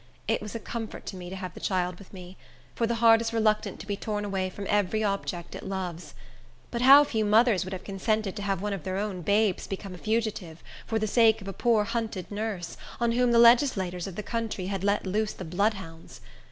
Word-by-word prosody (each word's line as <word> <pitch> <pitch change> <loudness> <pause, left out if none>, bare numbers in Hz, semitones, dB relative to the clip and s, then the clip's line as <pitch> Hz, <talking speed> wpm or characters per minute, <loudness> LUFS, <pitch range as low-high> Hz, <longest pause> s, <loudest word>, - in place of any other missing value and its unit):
It - - +1
was 210 +1 -7
a - - -2
comfort 225 0 -6
to - - -6
me 180 -1 -8
to 190 - -6
have 185 -2 -6
the - - -10
child 180 -2 -1
with 200 - -14
me; 185 -1 -10 0.4
for 230 - 0
the 235 - 0
heart 230 0 +6
is 230 0 -3
reluctant 215 -2 +1
to - - -9
be 205 0 -2
torn 210 0 -3
away 190 -2 -1
from 200 +2 -7
every 205 +1 +1
object 195 -4 -3
it - - -7
loves. 180 -3 -5 0.6
But 235 - -2
how 275 +3 +9
few 220 -6 -1
mothers 215 -1 +4
would 185 - -6
have 185 - -6
consented 200 +1 -1
to 205 - -5
have 195 -1 -2
one 210 -1 -1
of 195 - -4
their 185 0 -3
own 200 -3 -3
babes 200 +2 +1
become 195 -1 -6
a 180 - -10
fugitive, 215 -7 -2 0.2
for 225 - 0
the 215 - 0
sake 225 0 +4
of 195 - -10
a 195 - -4
poor, 225 +1 +2
hunted 220 -5 -4
nurse, 205 -5 -4 0.2
on 235 -1 +2
whom 245 +1 +2
the 235 - +4
legislators 235 -7 +4
of 190 - -7
the 210 - -4
country 225 -4 -3
had 195 0 -3
let 200 +1 +1
loose 210 +3 -1
the 185 - -8
bloodhounds! 180 -2 -3
205 Hz, 230 wpm, -27 LUFS, 185-225 Hz, 0.6 s, how